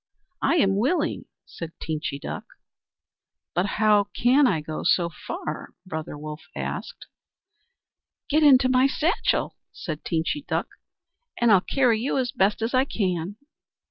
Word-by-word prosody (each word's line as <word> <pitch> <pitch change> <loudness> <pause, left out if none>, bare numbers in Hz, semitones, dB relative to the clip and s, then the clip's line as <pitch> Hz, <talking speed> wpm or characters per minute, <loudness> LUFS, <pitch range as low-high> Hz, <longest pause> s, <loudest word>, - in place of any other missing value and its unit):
"I - - +3
am 195 - +3
willing," 300 - 0 0.2
said 165 -1 -8
Teenchy 155 -3 -3
Duck. - - -5 1.1
"But 180 +4 +1
how 210 -2 +4
can 260 +4 +4
I 180 -8 +1
go 155 +1 -5
so 170 -2 +3
far?" 155 -1 -6
Brother 160 -4 -5
Wolf 150 +1 -7
asked. - - -5 1.2
"Get 305 +2 +2
into 265 -4 +6
my 255 +1 +4
satchel," 325 - 0
said 155 -3 -6
Teenchy 165 - -1
Duck, - - -1 0.7
"and 235 -1 +4
I'll 195 -3 +6
carry 245 -1 +2
you 270 +3 0
as 250 -2 0
best 210 -3 +1
I 255 0 +4
can." 185 - -2
210 Hz, 135 wpm, -25 LUFS, 165-260 Hz, 1.2 s, into